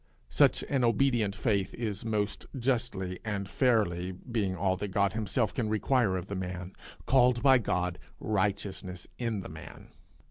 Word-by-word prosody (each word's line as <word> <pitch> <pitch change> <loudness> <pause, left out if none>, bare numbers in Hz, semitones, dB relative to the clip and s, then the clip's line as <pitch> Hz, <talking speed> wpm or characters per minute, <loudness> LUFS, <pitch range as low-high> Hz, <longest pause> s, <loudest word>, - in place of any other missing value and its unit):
Such - - +4
an 135 -3 0
obedient 115 -3 +2
faith 100 -5 0
is 105 -4 -3
most 105 -2 -2
justly 115 -8 -1
and 100 -3 -3
fairly, 100 -8 +1
being 100 0 -2
all 95 +1 +1
that 105 - -3
God 100 0 +1
himself 110 +1 0
can 115 -4 -1
require 110 -2 +2
of 90 - -5
the 100 - -6
man, 90 -1 -5 0.3
called 125 -2 +4
by 135 -2 +7
God 90 -4 -1 0.2
righteousness 95 -3 -2
in 115 -5 -1
the - - -8
man. 80 +1 -11
105 Hz, 150 wpm, -30 LUFS, 95-120 Hz, 0.3 s, by